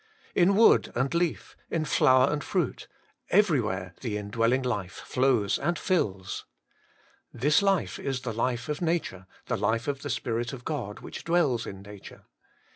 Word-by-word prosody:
in 190 +2 +4
wood 225 +3 +5
and 135 +4 0
leaf, 170 -1 -1
in 160 -2 -1
flower 130 -1 +4
and 150 - -2
fruit, 180 - -2 0.4
everywhere 115 - +2
the 110 -5 -2
indwelling 115 +5 0
life 100 -7 -2
flows 125 -6 +2
and 170 +3 0
tills. 100 - -1 0.9
This 150 - +3
life 195 -2 +1
is 135 -2 -3
the 115 -3 -4
life 120 +3 -1
of 150 +1 -3
nature, 160 - -2 0.2
the - - -1
life 110 +4 0
of 140 -1 -2
the 145 - -5
Spirit 120 -1 -2
of 125 -2 -9
God 125 -10 -4
which - - -8
dwells 155 -9 +1
in 95 0 -8
nature. 100 -1 -12
130 Hz, 155 wpm, -27 LUFS, 110-155 Hz, 0.9 s, wood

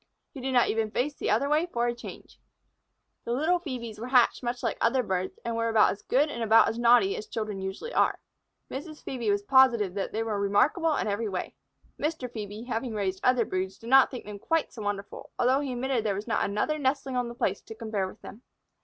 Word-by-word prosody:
He 270 - -8
did 265 +1 -2
not 245 -2 +4
even 220 0 0
face 260 +7 -1
the - - -3
other 280 - +2
way 305 +4 +2
for 240 -8 -1
a 240 - 0
change. 240 - -11 0.8
The 235 - -2
little 320 +7 +2
Phœbes 240 -9 -6
were 235 - -5
hatched 255 -2 +4
much 245 0 -3
like 230 - -1
other 250 +2 +3
birds, 185 -3 -2
and 235 -1 -2
were 230 0 0
about 220 -2 +5
as 200 - -7
good 280 +4 +2
and 265 -6 -5
about 225 0 +6
as 225 +1 -2
naughty 245 +12 +5
as 440 -1 -6
children 215 - -4
usually 190 - -5
are. - - +2 0.5
Mrs. 305 +3 -7
Phœbe 240 -5 -3
was 205 0 +1
positive 235 -5 +4
that 195 -1 -3
they 225 - -1
were 215 -2 -2
remarkable 285 - +2
in - - -1
every 210 +1 -1
way. 185 -2 -4 0.5
Mr. 300 -4 -2
Phœbe, 215 -1 -7
having 235 -1 -3
raised 190 -2 -2
other 250 -2 +3
broods, 190 +1 -3
did 230 +2 -9
not 270 -1 +7
think 250 - -8
them 205 -1 -8
quite 325 +8 0
so 230 - -8
wonderful, 205 -1 -5
although 255 +2 +3
he 280 -2 -3
admitted 260 +1 -1
that 225 - 0
there 205 -2 +1
was 205 +2 -5
not - - 0
another 210 +10 -1
nestling 270 -1 -1
on 245 -1 0
the 235 - -8
place 195 -4 -1
to 225 - -10
compare 215 -4 -2
with - - -12
them. 215 - -10
235 Hz, 230 wpm, -28 LUFS, 210-265 Hz, 0.8 s, not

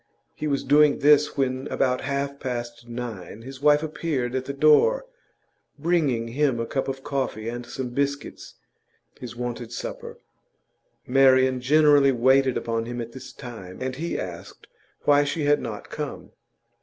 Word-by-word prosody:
He 155 - -4
was 140 -2 0
doing 145 +1 +5
this 150 +1 +4
when, 130 0 -1
about 125 -1 0
half 140 0 -3
past 120 -2 -5
nine, 115 -3 -7
his 135 +1 -10
wife 150 +1 +4
appeared 150 -5 -2
at 130 0 -2
the 140 - -3
door, 155 - +4 0.7
bringing 145 -8 0
him 135 -1 +1
a 115 - -1
cup 135 +3 -2
of 135 0 -5
coffee 135 -6 -3
and 120 +1 -5
some 130 0 -5
biscuits, 140 +3 -3 0.6
his 120 -2 -8
wonted 120 -1 -5
supper. - - -6 0.9
Marian 130 0 +4
generally 145 0 +5
waited 130 +1 +3
upon 115 -1 -2
him 120 0 -5
at 115 0 -5
this 130 +1 -10
time, 110 -8 -10
and 130 0 -4
he 170 +3 -3
asked 85 -2 -8 0.4
why 145 0 +5
she 145 +2 -2
had 145 0 +3
not 105 -3 -7
come. - - -6
130 Hz, 155 wpm, -25 LUFS, 120-145 Hz, 0.9 s, doing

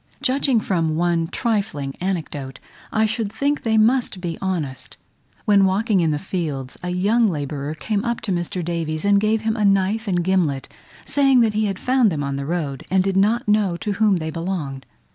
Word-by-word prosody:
Judging 270 -2 +3
from 165 -6 0
one 170 0 +1
trifling 195 - -2
anecdote, 155 -8 -3 0.3
I 220 0 +2
should 215 -1 -2
think 285 +5 0
they 220 -1 +1
must 230 -2 +2
be 175 -2 -4
honest. 150 -9 -4 0.5
When 200 -2 +5
walking 195 +2 +2
in 165 - +2
the 150 - 0
fields, 150 -7 -4
a 180 - -4
young 205 +6 +2
labourer 145 -3 -3
came 205 +5 -2
up 235 0 -1
to 205 - -3
Mr. 175 0 -2
Davies, 165 -1 -2
and 200 0 +5
gave 215 +1 +1
him 220 0 0
a 215 - -1
knife 200 +3 +2
and 175 -3 +1
gimlet, 170 -7 0 0.4
saying 275 -3 +4
that 225 -2 +2
he 215 +1 +1
had 195 -2 -2
found 250 -3 +2
them 150 -3 -2
on 140 0 -2
the 140 0 -4
road, 150 -6 -3
and 190 0 +3
did 195 0 -1
not 210 +5 +2
know 210 -4 +2
to 210 - -3
whom 210 0 +3
they 160 -1 -4
belonged! 155 -6 -4
190 Hz, 195 wpm, -21 LUFS, 160-215 Hz, 0.5 s, When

